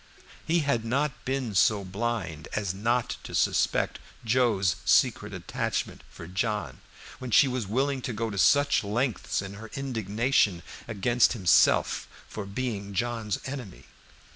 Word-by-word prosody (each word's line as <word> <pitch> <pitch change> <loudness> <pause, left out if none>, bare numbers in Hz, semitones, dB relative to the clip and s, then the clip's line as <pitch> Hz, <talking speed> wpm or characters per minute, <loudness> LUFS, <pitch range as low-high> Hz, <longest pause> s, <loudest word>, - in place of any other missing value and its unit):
He 170 +1 +3
had 140 -6 0
not 135 +4 -1
been 130 -4 -2
so 100 +3 +3
blind 95 -6 -3
as 100 -4 -1
not 115 +5 0
to - - -7
suspect - - +1 0.3
Joe's 110 -6 +2
secret - - +3
attachment - - -3
for 85 - -10
John, 105 +4 -3 0.4
when 130 - -6
she 130 +5 +6
was 125 -5 -2
willing 135 +5 0
to 125 - -3
go 115 0 -3
to 100 - -6
such 145 +5 +4
lengths 110 -1 -1
in 100 0 -7
her 110 +2 -10
indignation 115 - 0 0.2
against 120 +3 +2
himself 95 -8 +3 0.2
for 105 -2 -6
being 100 -2 -4
John's 115 -1 -1
enemy. 130 -8 -7
115 Hz, 140 wpm, -27 LUFS, 100-125 Hz, 0.4 s, she